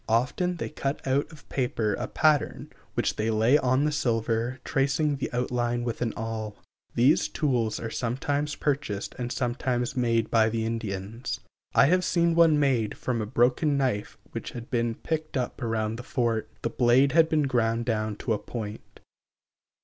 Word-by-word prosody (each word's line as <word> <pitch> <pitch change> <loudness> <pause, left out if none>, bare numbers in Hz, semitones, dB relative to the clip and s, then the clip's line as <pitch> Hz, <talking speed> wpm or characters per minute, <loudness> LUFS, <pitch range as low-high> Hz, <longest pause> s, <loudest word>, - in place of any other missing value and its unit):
Often 140 +11 +1
they - - -4
cut 140 -2 -3
out 140 +4 +1
of 155 - -15
paper 120 -5 0
a - - -3
pattern, 155 -2 +1 0.2
which - - 0
they 110 +1 0
lay 115 +6 +4
on 130 +2 +2
the 150 - +1
silver, 120 -3 0
tracing 140 +2 +1
the 135 - -3
outline 120 -1 -1
with 120 -1 -3
an 120 -2 0
awl. 110 -1 -4 0.4
These 130 +6 +4
tools 125 -8 0
are 115 - -5
sometimes 140 +5 -1
purchased 135 -9 -2
and 120 -1 -3
sometimes 125 0 -1
made 115 -3 +1
by 110 -1 +4
the 110 0 -1
Indians. 115 0 -4 0.4
I - - +7
have 180 +5 +3
seen 170 -1 +2
one 165 -3 +5
made 125 -7 +1
from 120 -3 -2
a 105 - -3
broken 130 +5 +2
knife 125 -7 -1
which - - -6
had 120 -1 -8
been 115 -2 0
picked 155 0 -3
up 130 +2 -3
around 115 -1 -1
the - - -6
fort. 120 -3 -1
The 115 - -1
blade 125 +4 +4
had 160 +2 +5
been 155 -2 +2
ground 120 -3 +1
down 110 -2 -1
to 115 - +2
a 105 - -1
point. 110 -2 -7
120 Hz, 170 wpm, -27 LUFS, 115-140 Hz, 0.4 s, I